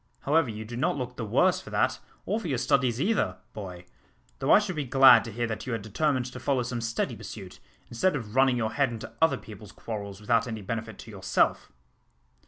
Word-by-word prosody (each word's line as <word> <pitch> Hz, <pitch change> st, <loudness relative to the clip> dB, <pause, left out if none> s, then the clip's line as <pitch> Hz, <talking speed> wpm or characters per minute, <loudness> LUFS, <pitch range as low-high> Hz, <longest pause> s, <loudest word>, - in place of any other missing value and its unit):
However, 150 Hz, -2 st, +2 dB
you 110 Hz, 0 st, -6 dB
do 120 Hz, +2 st, -7 dB
not 125 Hz, -, 0 dB
look 125 Hz, -1 st, -5 dB
the 120 Hz, -, -5 dB
worse 105 Hz, -, +2 dB
for -, -, -11 dB
that -, -, +1 dB, 0.3 s
or 210 Hz, +4 st, 0 dB
for 195 Hz, -, -6 dB
your 135 Hz, -5 st, 0 dB
studies 125 Hz, -2 st, +1 dB
either, 215 Hz, +7 st, +1 dB, 0.2 s
boy, 90 Hz, -4 st, -8 dB, 0.5 s
though 135 Hz, -, +1 dB
I -, -, +9 dB
should 205 Hz, -4 st, -1 dB
be 150 Hz, -, -1 dB
glad 130 Hz, -2 st, +7 dB
to 115 Hz, -, -6 dB
hear 120 Hz, +2 st, -2 dB
that 115 Hz, +1 st, -5 dB
you 125 Hz, -, -2 dB
had 115 Hz, -3 st, -3 dB
determined 130 Hz, +4 st, 0 dB
to 125 Hz, -, -7 dB
follow 130 Hz, -1 st, 0 dB
some 120 Hz, -1 st, -4 dB
steady 115 Hz, 0 st, -2 dB
pursuit, -, -, -9 dB, 0.3 s
instead 165 Hz, +10 st, +1 dB
of 110 Hz, -6 st, -5 dB
running 130 Hz, -1 st, +4 dB
your 110 Hz, -2 st, -1 dB
head 140 Hz, -2 st, +2 dB
into 115 Hz, -2 st, -8 dB
other 160 Hz, -, +4 dB
people's 105 Hz, -1 st, -12 dB
quarrels, 100 Hz, -3 st, -7 dB
without 115 Hz, +2 st, +1 dB
any 110 Hz, -3 st, -5 dB
benefit 110 Hz, 0 st, -5 dB
to 115 Hz, -, -11 dB
yourself." 95 Hz, -2 st, 0 dB
120 Hz, 215 wpm, -27 LUFS, 110-135 Hz, 0.5 s, I